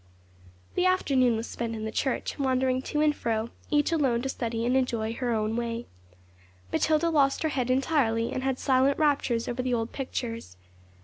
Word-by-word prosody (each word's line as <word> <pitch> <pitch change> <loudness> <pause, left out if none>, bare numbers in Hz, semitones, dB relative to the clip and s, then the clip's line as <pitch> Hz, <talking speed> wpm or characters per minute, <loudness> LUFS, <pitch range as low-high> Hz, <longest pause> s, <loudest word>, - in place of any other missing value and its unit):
The 365 - +2
afternoon 265 -10 +3
was 225 - -3
spent 230 -1 -4
in 220 0 -5
the 220 - -3
church, 265 +4 -2
wandering 260 -1 +1
to 295 +3 -2
and 300 -1 +3
fro, 225 -2 -2 0.2
each 295 +1 +2
alone 265 -7 +1
to 270 - -2
study 230 -3 -2
and 250 +2 +2
enjoy 235 -4 0
in 225 - -4
her 250 -2 -1
own 220 0 0
way. 235 0 -3 0.9
Matilda 320 +2 +2
lost 280 -2 +2
her 315 - +1
head 255 -4 -1
entirely, 255 -4 +1
and 260 - -2
had 265 -1 -1
silent 265 +1 +2
raptures 280 -6 +1
over 245 +1 -2
the 250 -1 0
old 225 0 -2
pictures. 230 - -5
255 Hz, 185 wpm, -27 LUFS, 230-275 Hz, 0.9 s, afternoon